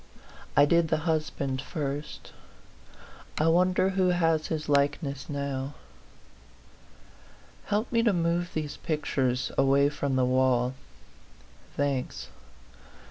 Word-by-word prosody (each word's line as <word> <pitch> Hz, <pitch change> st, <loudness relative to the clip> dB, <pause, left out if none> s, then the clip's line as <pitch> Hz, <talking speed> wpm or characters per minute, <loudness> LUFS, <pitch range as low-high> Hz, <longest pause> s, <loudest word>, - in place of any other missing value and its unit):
I 145 Hz, -, +8 dB
did 170 Hz, +2 st, +3 dB
the 155 Hz, -, +1 dB
husband 150 Hz, -5 st, -1 dB
first; 145 Hz, -1 st, -5 dB, 1.0 s
I 155 Hz, -, +2 dB
wonder 185 Hz, +2 st, +3 dB
who 190 Hz, -1 st, +1 dB
has 165 Hz, -3 st, +2 dB
his 155 Hz, -1 st, -3 dB
likeness 140 Hz, -1 st, 0 dB
now? 140 Hz, -1 st, -3 dB, 1.9 s
Help 210 Hz, +3 st, -1 dB
me 230 Hz, -1 st, +3 dB
to 230 Hz, -2 st, +3 dB
move 170 Hz, -1 st, 0 dB
these 155 Hz, -2 st, -3 dB
pictures 135 Hz, -5 st, -1 dB
away 140 Hz, +1 st, +4 dB
from 145 Hz, -2 st, -2 dB
the 130 Hz, -1 st, +3 dB
wall. 130 Hz, -1 st, +2 dB, 1.0 s
Thanks. 130 Hz, -, -2 dB
145 Hz, 105 wpm, -28 LUFS, 135-170 Hz, 1.9 s, I